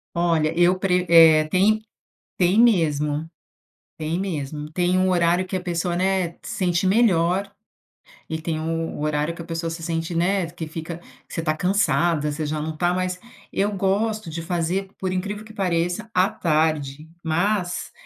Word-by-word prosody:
Olha, 165 -2 +1
eu 175 +2 +4
pre 180 -1 +1
eh, 160 -2 +7
tem 210 +5 +3 0.6
tem 185 +4 +3
mesmo. 155 -8 +2 0.7
Tem 160 +2 -2
mesmo. 150 -5 -4
Tem 180 +2 +1
um 185 0 +2
horário 175 +1 +2
que 190 - -5
a 185 - -1
pessoa, 175 -1 -2
né, 185 -2 0
se - - -7
sente 180 -1 +1
melhor 190 -2 +2 0.8
e 160 0 -3
tem 160 -1 -2
u - - -4
um 165 -1 -3
horário 150 +2 0
que 170 - -8
a 165 - -8
pessoa 165 0 -3
se 165 0 -6
sente, 165 0 -2
né, 180 +1 +1
que 165 -1 -7
fica 160 +1 -6
que 170 - -18
você 165 - -2
tá 155 -1 0
cansada, 170 -4 +1
você 155 +1 -3
já 150 +1 -2
não 155 0 -4
tá 175 +2 +1
mais 185 0 -2 0.3
eu 205 +2 +1
gosto 205 +1 0
de 165 +1 -5
fazer, 175 +3 -2
por 185 -1 -2
incrível 205 +3 -3
que 220 - -13
pareça, 180 +2 -1
à 185 +1 +4
tarde, 155 -2 0 0.2
mas, 180 +3 -1
175 Hz, 175 wpm, -23 LUFS, 160-185 Hz, 0.8 s, eh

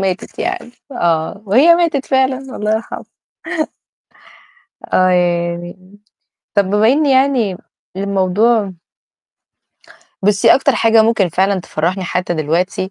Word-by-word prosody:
ماتت 190 -1 -4
يعني، 365 -8 -4 0.2
آه، 170 0 -1
وهي 275 - +5
ماتت 330 -6 0
فعلًا 265 -1 +1 0.2
الله 210 +1 -2
يرحمها. 220 - -5 1.9
آه 185 0 +3
ياني. 175 +2 -2 0.6
طَب 200 -2 +2
بما 210 +3 +2
إن 295 +4 +3
يعني 260 -8 +2 0.4
الموضوع 200 +2 +1 1.5
بُصّي، 200 -1 +4
أكتر 275 -1 +1
حاجة 225 0 +4
ممكن 220 -5 +1
فعلًا 190 +3 0
تفرّحني 180 +4 -3
حتّى 180 0 -2
دلوقتي، 175 +5 -2
200 Hz, 105 wpm, -16 LUFS, 180-240 Hz, 1.9 s, وهي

